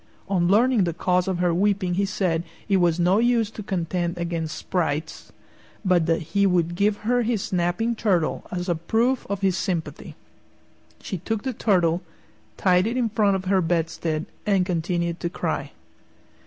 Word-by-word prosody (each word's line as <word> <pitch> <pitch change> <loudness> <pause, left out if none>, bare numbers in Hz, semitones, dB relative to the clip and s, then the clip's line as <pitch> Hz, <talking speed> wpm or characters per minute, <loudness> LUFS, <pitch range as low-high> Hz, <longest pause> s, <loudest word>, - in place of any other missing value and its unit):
On 180 -3 +1
learning 220 +1 +4
the 170 -2 -2
cause 180 +1 +1
of 190 -2 0
her 175 -1 +1
weeping 190 0 +1
he 200 +3 +1
said 180 -4 -1 0.2
it 195 - +3
was 175 -2 +2
no 180 +4 +3
use 235 -2 +2
to 220 - -8
contend 175 -2 -2
against 170 -2 -3
sprites, 160 -3 -3 0.5
but 175 -3 +3
that 165 0 +1
he 200 0 +4
would 175 -2 +1
give 200 +3 +1
her 245 +2 +2
his 230 -3 0
snapping 180 +6 0
turtle 185 -8 0
as 180 0 -3
a 175 - +2
proof 225 +10 0
of 200 -1 -2
his 190 -2 +2
sympathy. 175 -5 -4 0.9
She 190 - -4
took 215 +4 -3
the 260 - -2
turtle, 180 -6 +2 0.6
tied 185 0 +3
it 235 +3 -2
in 240 -3 +1
front 205 -2 +2
of 190 0 -4
her 190 0 +3
bedstead, 165 -1 -1 0.2
and 195 -3 +2
continued 170 -1 -1
to 170 - -2
cry. 180 - -3
185 Hz, 170 wpm, -24 LUFS, 170-205 Hz, 0.9 s, learning